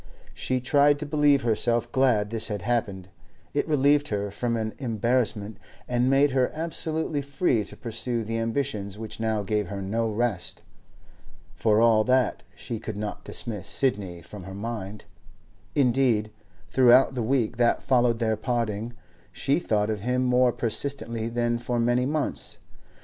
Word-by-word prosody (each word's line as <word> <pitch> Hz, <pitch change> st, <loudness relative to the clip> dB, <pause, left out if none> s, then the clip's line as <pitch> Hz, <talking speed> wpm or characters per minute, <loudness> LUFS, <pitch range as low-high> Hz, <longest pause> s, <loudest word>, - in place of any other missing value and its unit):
She 130 Hz, 0 st, -1 dB
tried 145 Hz, +3 st, +3 dB
to 150 Hz, -, -5 dB
believe 145 Hz, -2 st, +3 dB
herself 115 Hz, 0 st, +1 dB
glad 115 Hz, -6 st, +2 dB
this 115 Hz, -1 st, +1 dB
had 105 Hz, -4 st, -4 dB
happened; 100 Hz, -6 st, -2 dB, 0.4 s
it 145 Hz, -, 0 dB
relieved 145 Hz, -1 st, +3 dB
her 100 Hz, -1 st, -2 dB
from 115 Hz, +3 st, -2 dB
an 110 Hz, -1 st, -3 dB
embarrassment, 115 Hz, -3 st, -1 dB, 0.3 s
and 125 Hz, +1 st, +1 dB
made 140 Hz, +1 st, +4 dB
her 130 Hz, -1 st, +2 dB
absolutely 160 Hz, -2 st, 0 dB
free 140 Hz, -, 0 dB
to -, -, -7 dB
pursue 115 Hz, 0 st, -2 dB
the 115 Hz, +1 st, -3 dB
ambitions 110 Hz, -4 st, -2 dB
which 110 Hz, 0 st, -6 dB
now 110 Hz, -2 st, 0 dB
gave 105 Hz, 0 st, -1 dB
her 100 Hz, +2 st, -5 dB
no 110 Hz, +4 st, -1 dB
rest. 110 Hz, -4 st, -2 dB, 0.9 s
For 105 Hz, +4 st, +2 dB
all 110 Hz, -2 st, +5 dB
that, 130 Hz, 0 st, +2 dB
she 115 Hz, -4 st, -6 dB
could 110 Hz, -2 st, -6 dB
not 105 Hz, 0 st, -5 dB
dismiss 105 Hz, -7 st, -1 dB
Sidney 100 Hz, -, -1 dB
from 95 Hz, +2 st, -10 dB
her 95 Hz, 0 st, -8 dB
mind; 105 Hz, -1 st, -6 dB, 0.7 s
indeed, 125 Hz, -5 st, +2 dB, 0.4 s
throughout 125 Hz, +4 st, +5 dB
the 125 Hz, -, -2 dB
week 120 Hz, -1 st, 0 dB
that 120 Hz, -1 st, +2 dB
followed 120 Hz, -2 st, +2 dB
their 110 Hz, -1 st, 0 dB
parting, 115 Hz, 0 st, -2 dB, 0.4 s
she 140 Hz, +4 st, 0 dB
thought 110 Hz, -9 st, 0 dB
of 105 Hz, -, -3 dB
him 125 Hz, +3 st, 0 dB
more 125 Hz, 0 st, +3 dB
persistently 115 Hz, -1 st, -2 dB
than 120 Hz, 0 st, 0 dB
for 120 Hz, 0 st, -2 dB
many 120 Hz, +2 st, +2 dB
months. 150 Hz, 0 st, -3 dB
120 Hz, 155 wpm, -26 LUFS, 105-130 Hz, 0.9 s, all